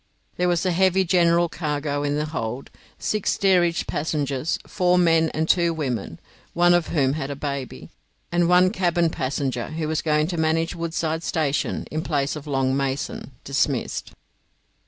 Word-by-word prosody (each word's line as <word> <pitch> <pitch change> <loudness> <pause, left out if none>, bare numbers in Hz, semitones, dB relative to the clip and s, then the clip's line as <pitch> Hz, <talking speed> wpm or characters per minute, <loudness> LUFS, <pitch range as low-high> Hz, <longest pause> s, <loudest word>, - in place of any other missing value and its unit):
There 180 - +1
was 175 0 +1
a 185 - +2
heavy 190 +2 +3
general 170 -1 +3
cargo 150 -3 -2
in 145 0 0
the 150 +1 -1
hold, 130 -5 -5 0.3
six 215 -2 0
steerage 175 -3 +2
passengers, 145 -1 -1
four 180 -2 +2
men 165 -2 +4
and 160 +1 -2
two 170 -2 +2
women 125 - -3 0.4
(one 175 0 +5
of 175 -2 +2
whom 135 -4 +1
had 145 -2 -3
a 140 - -4
baby), 140 -2 -5 0.4
and 175 0 +2
one 180 +1 +5
cabin 175 -4 +1
passenger, 130 -3 -2
who 155 0 -3
was 155 0 -1
going 150 -1 +2
to 175 - -3
manage 160 +1 +1
Woodside 165 -1 -2
Station 155 -4 -1
in 155 - -2
place 145 -3 -1
of 150 0 -8
Long 135 -2 +1
Mason, 135 0 -3
dismissed. - - -1
160 Hz, 160 wpm, -23 LUFS, 145-175 Hz, 0.4 s, one